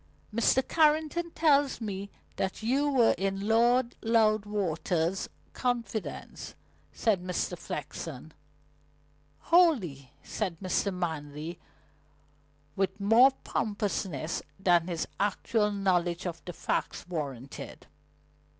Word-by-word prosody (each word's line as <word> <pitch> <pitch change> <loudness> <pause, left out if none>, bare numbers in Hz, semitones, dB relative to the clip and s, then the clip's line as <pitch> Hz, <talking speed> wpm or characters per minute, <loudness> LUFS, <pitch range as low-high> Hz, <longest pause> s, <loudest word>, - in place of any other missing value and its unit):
"Mr. 235 +3 +3
Carrington 315 +2 +2
tells 290 -4 +3
me 200 -3 -4 0.3
that 190 +3 -2
you 275 +6 +2
were 250 -5 +4
in 195 +1 -1
Lord 235 +2 +3
Loudwater's 205 -6 +1 0.2
confidence," 230 - -3 0.4
said 210 -5 +1
Mr. 180 -1 -2
Flexen. - - -6 1.2
"Wholly," 205 - +3
said 185 -6 -3
Mr. 195 +1 0
Manley, 160 -2 -4 1.2
with 195 +1 -1
more 225 +6 +7
promptness 195 -7 -2 0.2
than 175 -3 +3
his 170 -2 -2
actual 210 +1 +1
knowledge 180 -3 0
of 170 -2 -5
the 175 - -6
facts - - -2
warranted. 140 -7 -6
200 Hz, 95 wpm, -29 LUFS, 175-235 Hz, 1.2 s, more